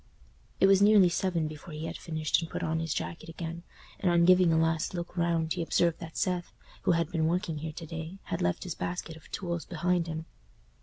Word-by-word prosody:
It -, -, +6 dB
was 195 Hz, 0 st, +6 dB
nearly 205 Hz, -3 st, +7 dB
seven 170 Hz, -2 st, 0 dB
before 155 Hz, +1 st, -9 dB
he 155 Hz, +1 st, -4 dB
had 165 Hz, +1 st, -4 dB
finished 155 Hz, -1 st, 0 dB
and 165 Hz, -, -5 dB
put -, -, -4 dB
on 160 Hz, 0 st, 0 dB
his 165 Hz, -1 st, -3 dB
jacket 165 Hz, +1 st, -4 dB
again; 165 Hz, +1 st, -5 dB, 0.4 s
and 180 Hz, -, +2 dB
on 170 Hz, 0 st, +5 dB
giving 180 Hz, -1 st, +6 dB
a 160 Hz, -, +3 dB
last 165 Hz, +2 st, +1 dB
look 175 Hz, 0 st, -5 dB
round, 170 Hz, -2 st, +1 dB
he 180 Hz, -, -3 dB
observed 165 Hz, 0 st, +2 dB
that 165 Hz, -2 st, -8 dB
Seth, 180 Hz, -2 st, -1 dB, 0.3 s
who -, -, +3 dB
had 170 Hz, 0 st, 0 dB
been 160 Hz, -3 st, +1 dB
working 170 Hz, -2 st, -1 dB
here 155 Hz, 0 st, -5 dB
to 165 Hz, -, -7 dB
day, 160 Hz, +3 st, -6 dB
had -, -, -3 dB
left 90 Hz, 0 st, 0 dB
his 180 Hz, -, -4 dB
basket 170 Hz, -1 st, -4 dB
of 160 Hz, -, -16 dB
tools 170 Hz, -3 st, -3 dB
behind 175 Hz, 0 st, 0 dB
him. 160 Hz, 0 st, -4 dB
170 Hz, 220 wpm, -29 LUFS, 160-180 Hz, 0.4 s, nearly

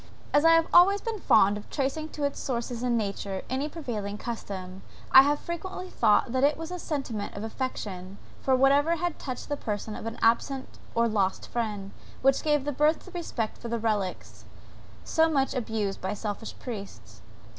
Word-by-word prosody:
As 290 Hz, -, +5 dB
I 330 Hz, -, +8 dB
have 330 Hz, 0 st, +5 dB
always 390 Hz, +3 st, +7 dB
been 450 Hz, -2 st, -4 dB
fond 205 Hz, -, +5 dB
of 210 Hz, -, -10 dB
tracing 300 Hz, +3 st, -2 dB
to 295 Hz, -, -6 dB
its 280 Hz, 0 st, -1 dB
source 240 Hz, -1 st, -2 dB
in 240 Hz, 0 st, 0 dB
nature 200 Hz, -2 st, -3 dB
any 270 Hz, +3 st, -1 dB
prevailing 220 Hz, -10 st, -4 dB
custom, 195 Hz, -5 st, -6 dB, 0.3 s
I 265 Hz, -, +11 dB
have 290 Hz, +2 st, +2 dB
frequently 365 Hz, +2 st, -6 dB
thought 220 Hz, 0 st, +3 dB
that 260 Hz, +1 st, +1 dB
it 290 Hz, +1 st, +4 dB
was 325 Hz, +1 st, -6 dB
a 360 Hz, -, -4 dB
sentiment 265 Hz, -11 st, -4 dB
of 200 Hz, -, -5 dB
affection 205 Hz, -6 st, -5 dB, 0.2 s
for 265 Hz, -, +3 dB
whatever 280 Hz, +5 st, +4 dB
had 345 Hz, 0 st, -2 dB
touched 255 Hz, -3 st, -5 dB
the 290 Hz, -, -1 dB
person 210 Hz, -2 st, -4 dB
of -, -, -6 dB
an 225 Hz, -, -5 dB
absent 260 Hz, +4 st, +1 dB, 0.2 s
or 235 Hz, 0 st, +3 dB
lost 200 Hz, -4 st, 0 dB
friend, 210 Hz, -4 st, -3 dB, 0.3 s
which 270 Hz, 0 st, +4 dB
gave 295 Hz, -3 st, +1 dB
birth 300 Hz, +3 st, +4 dB
to 370 Hz, -, -12 dB
that -, -, -23 dB
respect 265 Hz, -11 st, -3 dB
for 235 Hz, -, -6 dB
relics, 210 Hz, -4 st, -2 dB, 0.6 s
so 320 Hz, 0 st, +3 dB
much 275 Hz, -4 st, +1 dB
abused 220 Hz, -5 st, -2 dB
by 190 Hz, +2 st, -2 dB
selfish 210 Hz, +1 st, -5 dB
priests. 110 Hz, -, -8 dB
245 Hz, 180 wpm, -28 LUFS, 210-295 Hz, 0.6 s, I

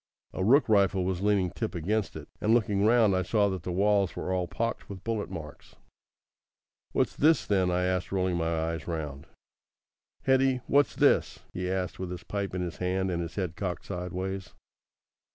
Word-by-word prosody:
A 95 Hz, -, -2 dB
rook 135 Hz, +9 st, +5 dB
rifle 100 Hz, -3 st, +3 dB
was 95 Hz, -1 st, -1 dB
leaning 100 Hz, -3 st, +2 dB
tip 110 Hz, -1 st, -4 dB
against 100 Hz, +6 st, -1 dB
it, -, -, -8 dB
and 110 Hz, +2 st, +4 dB
looking 105 Hz, -3 st, +2 dB
round 110 Hz, -4 st, +4 dB
I 95 Hz, -, +2 dB
saw 100 Hz, +2 st, +2 dB
that 95 Hz, -2 st, -3 dB
the 90 Hz, -, -4 dB
walls 100 Hz, +1 st, +2 dB
were 95 Hz, -, -3 dB
all 90 Hz, -1 st, 0 dB
pocked 115 Hz, +6 st, -3 dB
with 95 Hz, -2 st, -8 dB
bullet 115 Hz, -2 st, -2 dB
marks. 75 Hz, -3 st, -9 dB, 1.2 s
"What's -, -, 0 dB
this, 160 Hz, +2 st, +4 dB
then?" 95 Hz, -3 st, +2 dB
I 90 Hz, 0 st, +1 dB
asked, 90 Hz, 0 st, -1 dB
rolling 95 Hz, -2 st, 0 dB
my 80 Hz, -1 st, 0 dB
eyes 80 Hz, -3 st, -6 dB
round. 75 Hz, -3 st, -5 dB, 1.0 s
"Hetty, 130 Hz, -1 st, +3 dB
what's 145 Hz, +1 st, +3 dB
this?" -, -, +2 dB
he 90 Hz, 0 st, -3 dB
asked, 95 Hz, -1 st, -2 dB
with 95 Hz, -1 st, -4 dB
his 90 Hz, -1 st, -6 dB
pipe 100 Hz, -2 st, -3 dB
in 90 Hz, -, -1 dB
his 85 Hz, -2 st, -5 dB
hand 95 Hz, +1 st, -1 dB
and 85 Hz, -1 st, -1 dB
his 85 Hz, -1 st, -6 dB
head 90 Hz, -5 st, -2 dB
cocked 90 Hz, -4 st, -4 dB
sideways. 95 Hz, +1 st, -5 dB
95 Hz, 185 wpm, -28 LUFS, 90-105 Hz, 1.2 s, rook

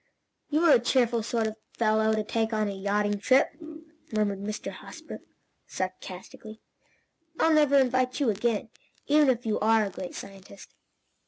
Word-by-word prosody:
"You're 310 Hz, +2 st, +4 dB
a 245 Hz, -, +7 dB
cheerful 240 Hz, -1 st, +1 dB
sort 225 Hz, +1 st, -1 dB
of 220 Hz, 0 st, -4 dB, 0.2 s
fellow 220 Hz, -1 st, +2 dB
to 215 Hz, -, -1 dB
take 225 Hz, +1 st, -1 dB
on 215 Hz, -1 st, 0 dB
a -, -, -2 dB
yachting 205 Hz, +1 st, -1 dB
trip," 260 Hz, +6 st, +4 dB, 0.6 s
murmured 210 Hz, -2 st, 0 dB
Mr. 210 Hz, +2 st, -5 dB
Hosbrook, -, -, -10 dB, 0.5 s
sarcastically. 185 Hz, +4 st, -7 dB, 0.8 s
"I'll 325 Hz, -, +4 dB
never 295 Hz, -2 st, +4 dB
invite 255 Hz, 0 st, +1 dB
you 265 Hz, -6 st, +2 dB
again, 220 Hz, +1 st, -1 dB, 0.4 s
even 295 Hz, -1 st, +4 dB
if 245 Hz, -2 st, 0 dB
you 215 Hz, -1 st, 0 dB
are 220 Hz, 0 st, +3 dB
a 200 Hz, -, -5 dB
great 180 Hz, 0 st, -7 dB
scientist." 195 Hz, 0 st, -11 dB
220 Hz, 150 wpm, -27 LUFS, 205-250 Hz, 0.8 s, a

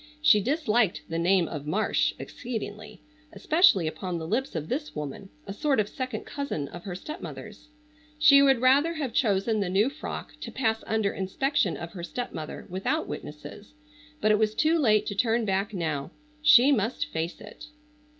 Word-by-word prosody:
She 300 Hz, -9 st, +5 dB
disliked 230 Hz, -, +1 dB
the 165 Hz, 0 st, -2 dB
name 175 Hz, 0 st, +3 dB
of 150 Hz, -2 st, -6 dB
"Marsh" 210 Hz, +8 st, +1 dB
exceedingly, 220 Hz, -3 st, -7 dB, 0.3 s
especially 315 Hz, -, +4 dB
upon 175 Hz, +2 st, -3 dB
the 160 Hz, -, -5 dB
lips 255 Hz, +6 st, -2 dB
of 155 Hz, -1 st, -3 dB
this 295 Hz, -, -4 dB
woman, 150 Hz, +6 st, -6 dB, 0.2 s
a 195 Hz, -, -6 dB
sort 280 Hz, +2 st, +1 dB
of 210 Hz, -, +1 dB
second 255 Hz, -1 st, -5 dB
cousin 280 Hz, -, -4 dB
of 175 Hz, -, -10 dB
her 185 Hz, -3 st, -5 dB
stepmother's. 305 Hz, -, -9 dB, 0.5 s
She 300 Hz, -2 st, +7 dB
would 270 Hz, -3 st, +4 dB
rather 285 Hz, +6 st, +4 dB
have 275 Hz, -7 st, -3 dB
chosen 215 Hz, -1 st, +1 dB
the 195 Hz, -3 st, -1 dB
new 205 Hz, +8 st, +2 dB
frock 310 Hz, -, -7 dB
to -, -, -6 dB
pass 225 Hz, -3 st, -1 dB
under 220 Hz, -2 st, 0 dB
inspection 195 Hz, -, 0 dB
of 170 Hz, 0 st, -7 dB
her 180 Hz, -, -7 dB
stepmother 170 Hz, -6 st, -6 dB
without 195 Hz, -, -2 dB
witnesses, 155 Hz, -, -9 dB, 0.5 s
but 215 Hz, -, +3 dB
it 210 Hz, -, +3 dB
was 215 Hz, -1 st, +1 dB
too 320 Hz, +5 st, +2 dB
late 215 Hz, -6 st, +3 dB
to -, -, -3 dB
turn 225 Hz, +2 st, +1 dB
back 195 Hz, +1 st, 0 dB
now. 160 Hz, -7 st, -3 dB, 0.3 s
She 290 Hz, -3 st, +7 dB
must 230 Hz, -2 st, 0 dB
face 165 Hz, +2 st, -4 dB
it. 210 Hz, +7 st, -12 dB
215 Hz, 170 wpm, -27 LUFS, 185-270 Hz, 0.5 s, She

